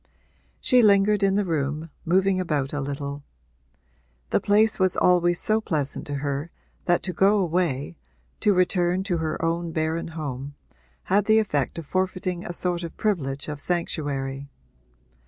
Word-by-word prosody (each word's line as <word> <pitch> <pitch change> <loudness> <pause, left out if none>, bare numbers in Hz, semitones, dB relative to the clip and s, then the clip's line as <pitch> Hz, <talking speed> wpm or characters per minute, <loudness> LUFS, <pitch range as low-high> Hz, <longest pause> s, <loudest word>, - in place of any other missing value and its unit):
She 250 -3 +4
lingered 205 -1 +4
in 195 -1 +3
the 205 0 +1
room, 155 -1 -2
moving 190 +2 +2
about 150 -6 -1
a 145 - -2
little; 140 0 -5 1.1
the - - +3
place 210 +1 +3
was 185 -1 +2
always 175 -1 +3
so 215 +1 +1
pleasant 150 -8 -2
to 145 - -3
her 140 +3 -2 0.4
that 175 -1 +2
to 180 - -3
go 200 +3 +4
away 170 - -1 0.4
to 210 - +3
return 180 0 +2
to 185 -3 -1
her 160 -1 -2
own 165 0 -1
barren 160 +1 -1
home 140 -2 -5 0.5
had 200 +2 +2
the 220 +1 +5
effect 160 -10 0
of 165 - -6
forfeiting 185 +1 -2
a - - -5
sort 175 0 -2
of 170 -2 -7
privilege 145 -10 -1
of 150 -1 -5
sanctuary. 140 -5 -2
175 Hz, 155 wpm, -25 LUFS, 145-190 Hz, 1.1 s, the